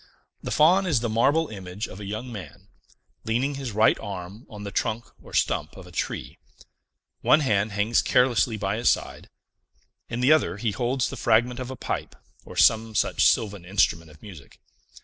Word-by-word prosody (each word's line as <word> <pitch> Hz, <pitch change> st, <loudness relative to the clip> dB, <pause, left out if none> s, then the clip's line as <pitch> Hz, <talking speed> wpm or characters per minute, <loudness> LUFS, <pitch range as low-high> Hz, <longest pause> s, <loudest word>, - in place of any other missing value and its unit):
The -, -, -5 dB
Faun 180 Hz, +5 st, +4 dB
is 145 Hz, -10 st, +2 dB
the 120 Hz, -, -1 dB
marble 145 Hz, +8 st, +2 dB
image 95 Hz, 0 st, -6 dB
of 95 Hz, -, -11 dB
a 100 Hz, -, -7 dB
young 110 Hz, +5 st, -5 dB
man, 105 Hz, -5 st, -10 dB, 0.5 s
leaning 125 Hz, +6 st, 0 dB
his 135 Hz, -3 st, -5 dB
right 110 Hz, +2 st, +3 dB
arm 100 Hz, +2 st, -8 dB
on 105 Hz, -3 st, -9 dB
the 100 Hz, -, -6 dB
trunk 110 Hz, +4 st, -2 dB, 0.2 s
or -, -, -15 dB
stump -, -, -1 dB
of -, -, -11 dB
a -, -, -14 dB
tree; -, -, -4 dB, 0.8 s
one 155 Hz, -, +4 dB
hand 105 Hz, -5 st, +1 dB
hangs 105 Hz, +3 st, +2 dB
carelessly 125 Hz, -2 st, +2 dB
by 100 Hz, 0 st, -2 dB
his 120 Hz, -, +3 dB
side; -, -, -2 dB, 0.8 s
in 115 Hz, -, -3 dB
the 125 Hz, +4 st, +4 dB
other 155 Hz, -9 st, +3 dB
he 110 Hz, +1 st, -1 dB
holds 125 Hz, +3 st, -1 dB
the -, -, -7 dB
fragment 120 Hz, +3 st, +2 dB
of 130 Hz, -1 st, -5 dB
a 130 Hz, -, -6 dB
pipe, -, -, -4 dB, 0.3 s
or -, -, -11 dB
some 110 Hz, 0 st, +3 dB
such -, -, +1 dB
sylvan 100 Hz, -4 st, 0 dB
instrument 85 Hz, -3 st, +1 dB
of 75 Hz, 0 st, -18 dB
music. 85 Hz, -10 st, -13 dB
110 Hz, 185 wpm, -25 LUFS, 100-125 Hz, 0.8 s, Faun